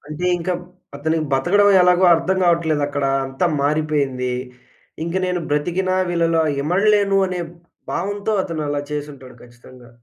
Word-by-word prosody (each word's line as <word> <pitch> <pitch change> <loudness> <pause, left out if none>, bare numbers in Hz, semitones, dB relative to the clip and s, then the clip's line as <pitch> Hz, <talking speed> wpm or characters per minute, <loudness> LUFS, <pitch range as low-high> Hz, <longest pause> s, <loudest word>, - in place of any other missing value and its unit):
అంటే 155 +4 -4
ఇంక 175 +1 -4
మ్ - - -11 0.4
అతనికి 160 +2 -1
బతకడం 195 +10 +3
ఎలాగో 180 +1 +4
అర్థం 170 +3 0
గావట్లేదక్కడా. 150 -5 +1 0.2
అంతా 135 +7 -1 0.2
మారిపోయింది. 145 -4 0 0.7
ఇంక 170 +2 -4
నేను 180 -1 -1
బ్రతికిన 175 +6 -1 0.2
వీళ్ళలో 165 -1 +1 0.2
ఇమడలేను 200 +4 +2
అనే 180 -1 -4 0.5
భావంతో 205 +3 -2
అతను 165 -4 -4
అలా 145 0 -1
చేసుంటాడు. 145 -3 -7
ఖచ్చితంగా. 125 0 -16
160 Hz, 125 wpm, -20 LUFS, 145-180 Hz, 0.7 s, ఎలాగో